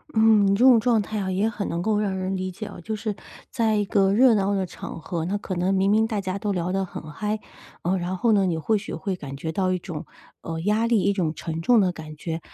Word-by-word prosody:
嗯， 220 -2 +5
你 195 - +3
这 225 - +2
种 255 -3 +8
状 230 -1 +2
态 215 +1 -5
呀 195 -2 -2
也 195 +4 +1
很 220 -3 -4
能 170 +1 -2
够 210 +2 +1
让 200 -3 -1
人 190 +1 -2
理 185 0 -3
解 180 - -7
哦。 - - -10
就 220 +5 -4
是 215 -1 -3 0.4
在 225 -4 +1
一 210 - +2
个 195 -1 +2
热 240 +2 +6
闹 200 0 +1
的 190 -1 0
场 170 -1 -8
合， 165 -1 -3
那 195 +4 -1
可 200 - -5
能 180 +2 +1
明 195 +1 +2
明 220 +1 +3
大 215 -3 -2
家 190 0 -3
都 205 0 -1
聊 180 -1 -1
得 195 0 0
很 155 -3 -8
嗨， 210 +6 -2 0.4
呃， 185 +3 0
然 180 +1 -2
后 225 +5 +2
呢 200 -2 +4
你 175 -3 0
或 215 +7 +1
许 210 - -6
会 195 -2 -3
感 140 -4 -7
觉 160 +3 -4
到 185 +2 0
一 - - 0
种， 170 -2 -7 0.4
呃， 165 0 -5
压 210 +5 +1
力， 230 -4 +3
一 200 - +2
种 175 -6 -1
沉 165 0 -4
重 230 +5 +5
的 185 -2 +2
感 155 -3 -9
觉。 160 +1 -4
195 Hz, 290 characters per minute, -24 LUFS, 180-215 Hz, 0.4 s, 种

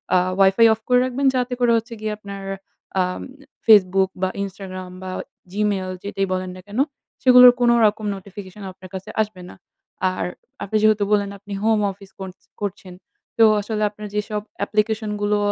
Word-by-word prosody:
আ - - +7 0.2
WiFi 195 +4 +6
off 220 - -7
করে 250 0 +5
রাখবেন 255 +2 -2
যাতে 250 0 0
করে 240 -1 +3
হচ্ছে 230 +1 -5
গিয়ে 215 0 -2
আপনার 200 -1 -8 0.6
আ - - +4 0.6
Facebook 190 -3 +5
বা 185 - +2
Instagram 185 -1 -7
বা 185 - -5 0.4
Gmail 200 -2 -1
যেটাই 195 -1 -2
বলেন 185 0 -3
না - - -10
কেন 210 +5 -4 0.4
সেগুলোর 250 -1 +9
কোনো 240 0 +5
রকম 210 0 +1
নোটিফিকেশন 195 +1 -10
আপনার 185 0 -14
কাছে 190 - -7
আসবে 210 -4 -4
না। - - -12 0.6
আর 185 - -3 0.4
আপনি 215 +2 0
যেহেতু 215 -1 +4
বললেন 200 -1 +2
আপনি 205 0 -9
হোম 220 -1 +3
অফিস 195 0 -15
করছ 190 0 -8 0.2
করছেন 190 -2 -5 0.4
তো 225 - +6 0.2
আসলে 215 0 -2
আপনার 210 0 -9
যেসব 210 0 -2 0.2
application 215 +1 0
গুলো 205 0 +2
205 Hz, 165 wpm, -22 LUFS, 190-220 Hz, 0.6 s, সেগুলোর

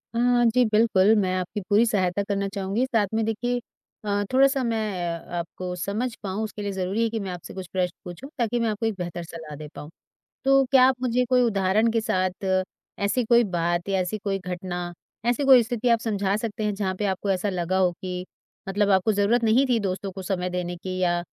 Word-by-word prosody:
अ, - - +1 0.3
जी, 245 +2 +4
बिल्कुल। 215 -2 +4
मैं 185 -3 +1
आपकी 195 +3 -4
पूरी 215 +3 +5
सहायता 200 -2 +1
करना 200 0 -1
चाहूँगी। 200 +5 -1
साथ 225 -6 +1
में 220 0 +1
देखिए 245 +3 -1 0.5
अ, 205 0 0
थोड़ा-सा 270 +1 +4
मैं 230 -2 0 0.6
आपको 180 +2 -5
समझ 210 +7 -2
पाऊँ, 200 +3 -2
उसके 215 -1 -6
लिए 205 -1 -2
ज़रूरी 190 +4 -1
है 230 - +1
कि 225 0 -3
मैं 195 -2 -4
आपसे 175 -2 -8
कुछ 190 -2 -7
प्रश्न 180 -1 0
पूछूँ, 180 +11 -8
ताकि 240 0 0
मैं 230 -1 +1
आपको 215 +2 -2
एक 225 - +1
बेहतर 175 -1 -5
सलाह 160 -2 -9
दे 150 +1 -8
पाऊँ। 150 - -8 0.6
तो 275 0 +5
क्या 260 -2 +7
आप 265 - +2
मुझे 250 0 +1
कोई 250 -1 +4
उदाहरण 215 0 +2
के 225 -1 +1
साथ 185 -1 -1
अ, 185 0 +2 0.4
ऐसी 200 +5 +1
कोई 235 +1 +5
बात 175 +2 0
या 195 -1 +1
ऐसी 185 +4 -2
कोई 195 -1 -2
घटना, 180 -1 -5 0.3
ऐसी 245 +4 +1
कोई 255 -3 +8
स्थिति 240 +1 -1
आप 230 -1 +4
समझा 200 -3 0
सकते 220 -1 -4
हैं, 210 -1 0
जहाँ 190 -2 -2
पे 210 - 0
आपको 195 +1 -2
ऐसा 190 +2 0
लगा 185 0 -1
हो 180 -2 +3
कि 180 -1 -4 0.4
मतलब 205 +1 +1
आपको 190 +3 +3
ज़रूरत 215 +4 +2
नहीं 235 +5 +4
थी 235 -2 +3
दोस्तों 195 0 -3
को 190 0 -7
समय 180 -1 -2
देने 180 -1 -3
की, 185 +1 -5
या 175 -1 +2
200 Hz, 215 wpm, -25 LUFS, 185-230 Hz, 0.6 s, कोई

